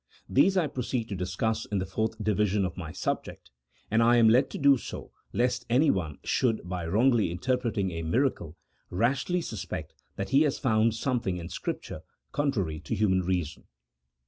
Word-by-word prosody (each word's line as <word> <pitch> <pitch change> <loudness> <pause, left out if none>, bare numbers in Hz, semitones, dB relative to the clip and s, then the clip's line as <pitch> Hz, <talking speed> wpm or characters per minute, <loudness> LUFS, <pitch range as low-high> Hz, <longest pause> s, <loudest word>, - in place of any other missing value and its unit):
These 190 +8 +4
I 175 - +3
proceed 125 -4 -3
to 100 - -3
discuss 95 +5 -1
in 100 - -2
the 95 - -1
fourth 110 +2 -2
division 105 -1 +1
of 90 - -4
my - - -6
subject, - - -4 0.4
and 110 +2 +4
I 120 +1 +5
am 115 -1 +6
led 120 +4 +4
to - - -6
do 140 -1 +6
so 120 - -7 0.2
lest 125 +2 0
anyone 100 - +2
should, 115 -7 0
by 90 -2 -3
wrongly 115 +2 +3
interpreting 115 0 -1
a 85 -1 -4
miracle, 85 - -1 0.3
rashly 125 - 0
suspect 110 - -6 0.2
that 100 - -4
he 140 +2 +4
has 150 -3 +2
found 110 -3 +2
something 115 -6 -1
in 85 -1 -7
Scripture - - -5 0.3
contrary 100 - -1
to 115 - -4
human 95 -3 +2
reason. 90 -3 -2
110 Hz, 170 wpm, -28 LUFS, 95-125 Hz, 0.4 s, am